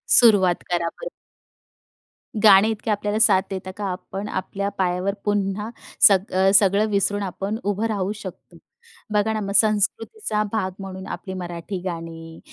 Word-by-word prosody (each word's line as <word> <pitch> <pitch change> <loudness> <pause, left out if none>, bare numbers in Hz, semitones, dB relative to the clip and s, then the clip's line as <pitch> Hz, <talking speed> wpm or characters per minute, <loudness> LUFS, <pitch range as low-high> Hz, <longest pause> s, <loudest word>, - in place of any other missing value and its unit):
सुरुवात 200 -7 +5
करा 170 -1 0
परत. - - -8 1.3
गाणे 205 +1 +7
इतके 215 0 -3
आपल्याला 210 +1 -1
साथ 190 -4 +5
देतात 190 -1 -6
का, 205 - -4
आपण 195 +2 -6
आपल्या 200 +1 -3
पायावर 185 +1 0
पुन्हा 205 +1 -1 0.4
सग 195 0 +2
अ, 190 +1 +3
सगळं 200 +1 +4
विसरून 205 0 0
आपण 195 +3 -4
उभं 205 +2 -1
राहू 200 -2 -2
शकतो? 195 -3 -10 0.6
बघा 210 +1 +2
ना, 215 - -2
मग 200 -1 -4
संस्कृतीचा 215 - +1
भाग 190 -4 -1
म्हणून 190 -1 -8
आपली 190 - -6
मराठी 175 +1 -6
गाणी 165 -2 -7
200 Hz, 145 wpm, -22 LUFS, 185-210 Hz, 1.3 s, गाणे